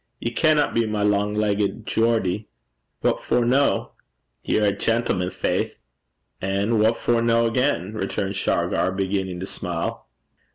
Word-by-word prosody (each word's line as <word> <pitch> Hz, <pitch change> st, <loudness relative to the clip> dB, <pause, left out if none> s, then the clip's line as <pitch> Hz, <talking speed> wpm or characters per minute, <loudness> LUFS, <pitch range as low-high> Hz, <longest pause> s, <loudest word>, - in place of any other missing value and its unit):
'Ye 115 Hz, -, -2 dB
canna 150 Hz, +3 st, +3 dB
be 115 Hz, -1 st, +1 dB
my 105 Hz, -1 st, -1 dB
lang 105 Hz, 0 st, +1 dB
leggit 105 Hz, +1 st, 0 dB
Geordie.' 110 Hz, -3 st, +1 dB, 0.5 s
'What -, -, +1 dB
for 120 Hz, -, +1 dB
no?' 135 Hz, +4 st, +2 dB, 0.5 s
'Ye're 110 Hz, -, +1 dB
a 100 Hz, -, +4 dB
gentleman, 100 Hz, -3 st, 0 dB
faith!' -, -, -2 dB, 0.6 s
'An' 100 Hz, +4 st, 0 dB
what 110 Hz, +2 st, +3 dB
for 120 Hz, -1 st, +1 dB
no, 115 Hz, 0 st, +3 dB
again?' 115 Hz, -4 st, 0 dB
returned 100 Hz, -1 st, -2 dB
Shargar, 95 Hz, -1 st, 0 dB
beginning 95 Hz, -1 st, -2 dB
to -, -, -3 dB
smile. 90 Hz, -3 st, -4 dB
105 Hz, 135 wpm, -23 LUFS, 95-115 Hz, 0.6 s, a